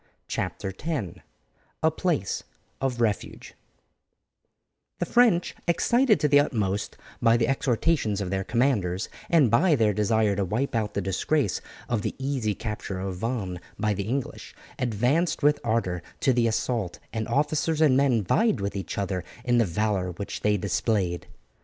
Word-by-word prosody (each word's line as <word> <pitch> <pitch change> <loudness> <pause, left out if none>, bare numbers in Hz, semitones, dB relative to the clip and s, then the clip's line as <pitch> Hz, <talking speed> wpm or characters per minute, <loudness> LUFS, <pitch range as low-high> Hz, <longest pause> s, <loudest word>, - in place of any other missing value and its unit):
CHAPTER 95 - -3
X: 145 - -3 0.6
A - - +4
PLACE - - -1 0.4
OF 130 -3 -1
REFUGE 105 -3 -2 1.4
The - - -1
French, 230 -8 +3
excited 235 +7 +3
to 150 - +4
the 145 0 +6
utmost 105 -8 -1 0.2
by 115 0 +5
the 115 - +1
exhortations 130 -4 +1
of 95 -2 -3
their 95 0 0
commanders, 105 -6 0 0.2
and 150 -9 +4
by 155 +7 +4
their 110 -5 +2
desire 105 0 +2
to 100 - +1
wipe 110 +9 -1
out 110 -2 -1
the 100 - 0
disgrace 105 +5 0 0.3
of 115 -3 0
the - - -3
easy 130 -6 -1
capture 105 -3 -5
of 95 -1 -4
Vannes 100 -4 -3 0.2
by 105 -1 +1
the 100 0 -3
English, 130 +2 -4 0.2
advanced 125 - +1
with 150 0 +4
ardour 110 -7 0 0.2
to 135 - +3
the 120 -1 +2
assault, 110 -4 -1 0.2
and 110 -2 -2
officers 150 +2 +1
and 150 -5 +5
men 130 -5 +3
vied 215 - +2
with 100 +1 -3
each 95 -3 -4
other 95 -3 -2 0.2
in 120 -1 +3
the 115 - +4
valour 95 0 -1
which 100 +4 -6
they 105 0 +2
displayed. 95 -2 -1
115 Hz, 155 wpm, -26 LUFS, 100-140 Hz, 1.4 s, the